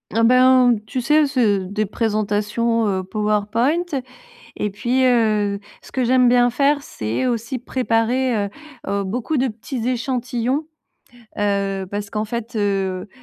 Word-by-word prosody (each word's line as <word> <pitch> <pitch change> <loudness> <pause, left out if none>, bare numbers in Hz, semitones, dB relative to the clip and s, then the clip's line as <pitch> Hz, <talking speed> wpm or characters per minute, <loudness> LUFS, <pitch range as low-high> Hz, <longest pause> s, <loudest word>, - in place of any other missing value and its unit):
Ah 230 - +3
ben 255 0 +5
tu 255 +3 -3
sais 300 +4 +3
c'est 235 -8 +2
des 210 +3 -1
présentations, 215 +2 0
heu, 190 -2 -1
PowerPoint 215 - 0 0.8
et 210 - -1
puis, 245 +6 0
heu, 215 -5 +2 0.2
ce - - -16
que 260 - 0
j'aime 250 +1 +4
bien 245 0 +4
faire, 280 +4 +2
c'est 110 - -3
aussi 235 +1 -2
préparer, 250 0 0
heu - - -10 0.4
heu, 200 0 0
beaucoup 245 +9 -2
de 265 +1 +2
petits 230 +1 -5
échantillons. 255 +2 -1 0.7
Heu, 200 -1 0
parce 205 0 -4
qu'en 215 +1 -2
fait, 235 +1 -5
heu 195 -2 -1
230 Hz, 140 wpm, -21 LUFS, 205-255 Hz, 0.8 s, ben